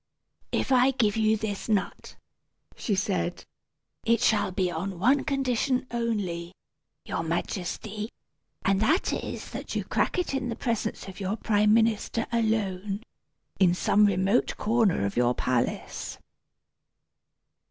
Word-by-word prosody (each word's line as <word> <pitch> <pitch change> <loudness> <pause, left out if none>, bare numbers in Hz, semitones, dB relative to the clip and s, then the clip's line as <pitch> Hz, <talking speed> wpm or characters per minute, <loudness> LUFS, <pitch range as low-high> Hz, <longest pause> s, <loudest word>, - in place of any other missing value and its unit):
"If - - -1
I 255 0 +6
give 230 -6 +1
you 220 0 +3
this 210 0 -4
nut," 200 -3 -1 0.6
she 210 - -1
said, 185 -2 -1 0.6
"it 230 0 +3
shall 205 -3 +2
be 185 -1 0
on 185 +3 -4
one 255 +10 +3
condition, 260 -1 0
only, 195 -7 -2 0.5
your - - -2
Majesty; 195 +5 -3 0.6
and 195 0 +3
that 315 - +2
is, - - -5
that - - -6
you - - 0
crack - - 0
it 360 -5 -1
in 265 -2 -1
the 230 - -2
presence 230 -4 -2
of 190 +1 -9
your 195 +2 -2
prime 210 -1 +3
minister 225 0 +1
alone, 210 -3 0 0.6
in 180 -2 +5
some 205 +3 +4
remote 195 +4 +1
corner 215 - +2
of 100 - -3
your 120 0 +3
palace." 125 -1 -2
210 Hz, 130 wpm, -27 LUFS, 190-230 Hz, 0.6 s, I